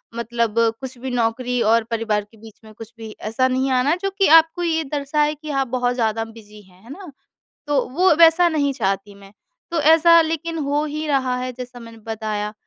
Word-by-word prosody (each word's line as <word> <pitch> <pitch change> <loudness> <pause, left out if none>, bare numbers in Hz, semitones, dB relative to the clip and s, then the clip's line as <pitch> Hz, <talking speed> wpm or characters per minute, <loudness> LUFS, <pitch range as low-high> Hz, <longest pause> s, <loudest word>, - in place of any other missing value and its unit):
मतलब 235 -1 -2 0.3
कुछ 260 -1 -8
भी 260 +1 -5
नौकरी 245 +1 -1
और 230 - +3
परिवार 220 -2 -1
के 225 - -20
बीच 220 0 -15
में 215 - -14
कुछ 225 +1 -12
भी 225 -1 -9 0.2
ऐसा 255 +3 +1
नहीं 260 +1 -1
आना 260 +6 +2
जो 390 - 0
कि 390 - +4
आपको 325 +2 -4
ये 320 -1 0
दर्शाए 295 +1 0
कि 305 +1 -11
आप 270 -2 -1
बहुत 245 0 -1
ज़्यादा 225 -2 -1
बिज़ी 215 -2 -15
हैं। 185 0 -23
है 230 - -16
ना? 365 0 -10 0.6
तो 290 -2 +1 0.2
वो 370 -3 +5
वैसा 335 +1 +6
नहीं 290 -3 0
चाहती 195 0 -3
मैं 200 0 -16 0.4
तो 335 -2 -1
ऐसा 335 +1 +6
लेकिन 325 +1 -4
हो 295 +1 0
ही 305 +1 -5
रहा 260 -3 0
है 255 0 -4
जैसा 245 -1 -9
मैंने 230 -1 -12
बताया 215 -1 -4
250 Hz, 205 wpm, -20 LUFS, 225-300 Hz, 0.6 s, वैसा